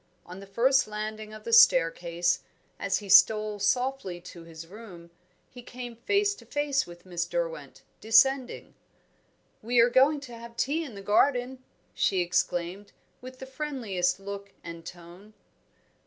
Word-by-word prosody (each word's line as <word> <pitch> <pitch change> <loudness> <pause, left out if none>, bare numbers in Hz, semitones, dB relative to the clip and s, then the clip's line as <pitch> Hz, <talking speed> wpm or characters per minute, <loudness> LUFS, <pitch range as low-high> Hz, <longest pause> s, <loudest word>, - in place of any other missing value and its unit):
On 180 +2 -10
the 195 - -12
first 260 +7 +2
landing 215 0 -6
of 215 0 -11
the 230 - -4
staircase, 175 -3 +4 0.4
as 195 -1 0
he 205 - -9
stole 210 +2 +5
softly 245 -4 -1
to 175 -1 -12
his 165 -1 -11
room, 180 -3 -13 0.4
he 250 - -11
came 245 -1 -9
face 400 - +1
to - - -15
face 290 -2 -1
with 175 +1 -13
Miss 175 -2 -3
Derwent, - - -5 0.2
descending. 260 +4 +2 0.9
"We 240 +2 +1
are 235 +1 +5
going 275 +4 +4
to 255 -4 -10
have 235 0 -12
tea 310 +5 0
in 260 -9 -9
the 200 - -9
garden," 250 +4 +1 0.3
she 190 -2 +1
exclaimed, 175 +2 -2 0.3
with 255 +1 -11
the 265 - -9
friendliest 255 -11 -2
look 200 0 -8
and 170 0 -9
tone. 175 +5 -13
215 Hz, 150 wpm, -27 LUFS, 180-255 Hz, 0.9 s, stole